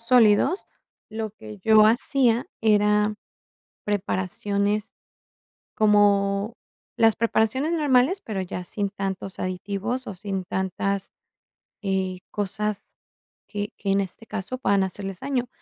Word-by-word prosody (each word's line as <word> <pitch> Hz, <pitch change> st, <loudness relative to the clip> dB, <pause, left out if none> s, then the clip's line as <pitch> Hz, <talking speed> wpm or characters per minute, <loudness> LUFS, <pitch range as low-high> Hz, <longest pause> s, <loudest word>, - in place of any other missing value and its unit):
sólidos, 245 Hz, -, +4 dB, 0.4 s
lo 220 Hz, 0 st, -3 dB
que 110 Hz, -, -11 dB
yo 220 Hz, -1 st, +7 dB
hacía 240 Hz, +1 st, +3 dB, 0.2 s
era 210 Hz, 0 st, +3 dB, 0.7 s
preparaciones, 200 Hz, +1 st, -1 dB, 0.8 s
como 205 Hz, 0 st, +3 dB, 0.4 s
las 225 Hz, -1 st, +4 dB
preparaciones 230 Hz, +7 st, +1 dB
normales, 295 Hz, +3 st, +3 dB
pero 210 Hz, -3 st, -4 dB
ya 180 Hz, 0 st, -5 dB
sin 200 Hz, +2 st, -2 dB
tantos 195 Hz, -1 st, -5 dB
aditivos, 200 Hz, +7 st, -3 dB
o 195 Hz, -, -5 dB
sin 190 Hz, 0 st, -4 dB
tantas, 190 Hz, +2 st, -2 dB, 0.7 s
eh, 190 Hz, -2 st, -1 dB
cosas 210 Hz, +1 st, -3 dB, 0.5 s
que 205 Hz, -1 st, -4 dB
que 195 Hz, -1 st, -1 dB
en 195 Hz, -, +3 dB
este 195 Hz, +3 st, -7 dB
caso 215 Hz, +3 st, -4 dB
puedan 200 Hz, -6 st, +2 dB
hacerles 190 Hz, 0 st, -5 dB
daño. 255 Hz, -3 st, -1 dB
205 Hz, 110 wpm, -25 LUFS, 195-225 Hz, 0.8 s, yo